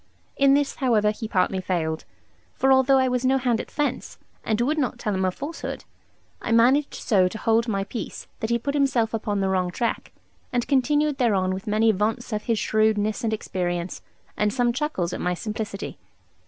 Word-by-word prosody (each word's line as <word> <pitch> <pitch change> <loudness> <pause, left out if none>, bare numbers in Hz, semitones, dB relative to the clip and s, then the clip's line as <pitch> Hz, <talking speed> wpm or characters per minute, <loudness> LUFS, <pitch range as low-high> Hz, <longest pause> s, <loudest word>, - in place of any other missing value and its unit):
In 275 0 +5
this, 285 -1 0
however, 220 -5 +2
he 220 +1 -6
partly 190 -2 +1
failed; 160 -4 -2 0.5
for 270 - +2
although 265 +1 +5
I 260 0 +3
was 250 0 0
no 260 +1 +3
hand 245 -3 +1
at - - -12
fence, 295 -1 -2 0.3
and 220 0 0
would 295 +6 +1
not 255 -3 -1
tell 215 -3 -2
him 190 0 0
a - - +3
falsehood, 285 - -6 0.6
I - - -3
managed 255 +6 +4
so 190 -5 +2
to 200 - -5
hold 225 +2 +2
my 195 -3 0
peace 215 +3 -6
that 220 - -2
he 235 - +2
put 280 +5 -3
himself 265 -6 +1
upon 205 -2 -1
the 190 - +1
wrong 185 -1 +1
track, 230 +6 -2 0.4
and 245 -1 -1
continued 290 +1 +2
thereon 195 -7 +2
with 190 +2 -6
many 220 +2 +3
vaunts 220 +4 -1
of 210 0 -3
his 230 -2 +1
shrewdness 215 +1 +1
and 225 - 0
experience, 175 -4 -3 0.3
and 210 0 +1
some 245 -1 +1
chuckles 235 - -2
at - - -4
my 180 0 0
simplicity. 210 0 -5
225 Hz, 195 wpm, -24 LUFS, 200-260 Hz, 0.6 s, In